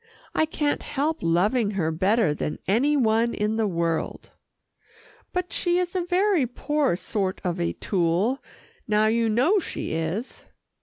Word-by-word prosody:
I 315 Hz, -, +2 dB
can't 295 Hz, -2 st, -1 dB
help 300 Hz, +3 st, -1 dB
loving 200 Hz, +7 st, +2 dB
her 160 Hz, -3 st, +1 dB
better 190 Hz, +1 st, +2 dB
than 150 Hz, 0 st, -3 dB
any 275 Hz, +9 st, +3 dB
one 230 Hz, -1 st, +2 dB
in 210 Hz, +1 st, 0 dB
the 220 Hz, -1 st, +1 dB
world." 170 Hz, -3 st, -2 dB, 1.0 s
"But 360 Hz, -1 st, -3 dB
she 350 Hz, -1 st, +1 dB
is 360 Hz, 0 st, -1 dB
a 365 Hz, -, +1 dB
very 360 Hz, -5 st, +2 dB
poor 290 Hz, -, 0 dB
sort 190 Hz, 0 st, -2 dB
of 180 Hz, -1 st, -2 dB
a 170 Hz, -, 0 dB
tool 190 Hz, +8 st, 0 dB, 0.4 s
now 215 Hz, 0 st, +3 dB
you 225 Hz, +1 st, +2 dB
know 270 Hz, -, +3 dB
she 340 Hz, -, -4 dB
is." 165 Hz, +9 st, -3 dB
225 Hz, 150 wpm, -25 LUFS, 185-295 Hz, 1.0 s, any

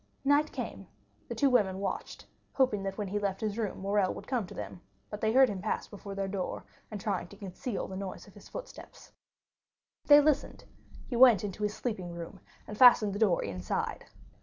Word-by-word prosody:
Night 290 Hz, +2 st, +3 dB
came, -, -, -6 dB, 0.4 s
the -, -, -5 dB
two 280 Hz, -2 st, +3 dB
women 205 Hz, -7 st, +3 dB
had 190 Hz, -, -6 dB
watched, 200 Hz, -, -4 dB, 0.3 s
hoping 255 Hz, -7 st, +2 dB
that 195 Hz, 0 st, -4 dB
when 205 Hz, -3 st, -3 dB
he 205 Hz, +2 st, -1 dB
left 195 Hz, -2 st, -2 dB
his 215 Hz, -2 st, -2 dB
room 220 Hz, -3 st, -3 dB
Morrel 200 Hz, -1 st, +1 dB
would -, -, -9 dB
come 240 Hz, -8 st, -1 dB
to -, -, -11 dB
them, 175 Hz, -, -7 dB, 0.3 s
but 210 Hz, -, -6 dB
they 220 Hz, -, +2 dB
heard 265 Hz, +2 st, +6 dB
him 200 Hz, -5 st, -4 dB
pass 210 Hz, -, -2 dB
before 200 Hz, -1 st, -9 dB
their 195 Hz, 0 st, -2 dB
door, 190 Hz, -2 st, -4 dB, 0.2 s
and 210 Hz, -, -6 dB
trying 195 Hz, -3 st, -2 dB
to 200 Hz, -, -14 dB
conceal 200 Hz, +3 st, -5 dB
the 190 Hz, -, -7 dB
noise 190 Hz, -1 st, -6 dB
of -, -, -17 dB
his -, -, -15 dB
footsteps. -, -, -10 dB, 1.0 s
They 290 Hz, 0 st, +9 dB
listened; 295 Hz, -1 st, +1 dB, 0.4 s
he 245 Hz, -, -5 dB
went 235 Hz, -5 st, +7 dB
into 205 Hz, 0 st, -5 dB
his 210 Hz, 0 st, -1 dB
sleeping 190 Hz, -8 st, -4 dB
room, 170 Hz, +3 st, -8 dB, 0.3 s
and 210 Hz, -, -8 dB
fastened 230 Hz, -5 st, +7 dB
the 200 Hz, -, -4 dB
door 205 Hz, -6 st, +3 dB
inside. 90 Hz, -2 st, -3 dB
205 Hz, 205 wpm, -30 LUFS, 195-235 Hz, 1.0 s, They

